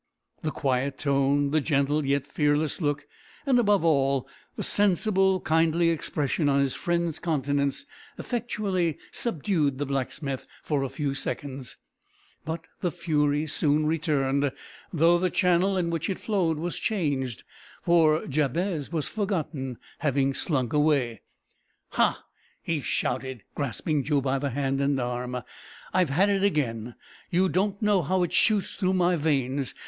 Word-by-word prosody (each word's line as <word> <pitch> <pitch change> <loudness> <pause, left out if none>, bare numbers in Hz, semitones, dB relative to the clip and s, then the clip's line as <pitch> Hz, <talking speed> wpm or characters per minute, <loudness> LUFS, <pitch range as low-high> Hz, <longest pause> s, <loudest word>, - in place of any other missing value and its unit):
The 155 - -1
quiet 135 -1 -1
tone, 140 0 +2
the 155 0 +2
gentle 145 +1 +1
yet 140 0 +1
fearless 150 +2 0
look, 145 -1 -1 0.4
and, 260 -3 +4
above 205 -6 +3
all, 140 -4 +2 0.3
the - - -4
sensible, 195 -1 +2
kindly 165 +1 +2
expression 150 -2 0
on 140 0 +3
his 140 -2 +1
friend's 170 -2 -1
countenance, 145 - 0 0.3
effectually 205 - -1
subdued 160 - 0
the 145 - -2
blacksmith 135 0 -3 0.2
for 145 -3 0
a 135 - -2
few 145 -1 -2
seconds, 135 -1 -5 0.7
but 160 +1 -5
the 180 - 0
fury 150 -3 0
soon 150 0 +2
returned, 145 -3 +1 0.4
though 170 +1 +4
the 185 +1 +1
channel 180 +2 +2
in 170 -2 0
which 165 +1 -2
it 190 - -2
flowed 180 -7 0
was 170 +3 -3
changed, 140 - -1 0.4
for 160 -2 +4
Jabez 155 +3 -1
was 160 -4 -1
forgotten, 160 - -3 0.2
having 140 -3 +1
slunk 130 -4 0
away. 145 -6 +2 0.7
"Ha!" - - +1 0.4
he 165 -3 -1
shouted, 130 -3 -2
grasping 145 +2 -1
Joe 145 0 +2
by 135 0 0
the 140 +1 -1
hand 135 +1 -1
and 140 -1 +1
arm, 125 0 -3 0.5
"I've 185 -4 +3
had 185 +9 +3
it 195 -1 +1
again! 120 - 0 0.3
You 185 +2 +2
don't 200 +2 0
know 205 -3 +4
how 180 +4 +1
it 175 - -2
shoots 210 -3 +2
through 185 -2 0
my 180 -1 +3
veins. 140 -4 0
150 Hz, 145 wpm, -27 LUFS, 140-175 Hz, 0.7 s, and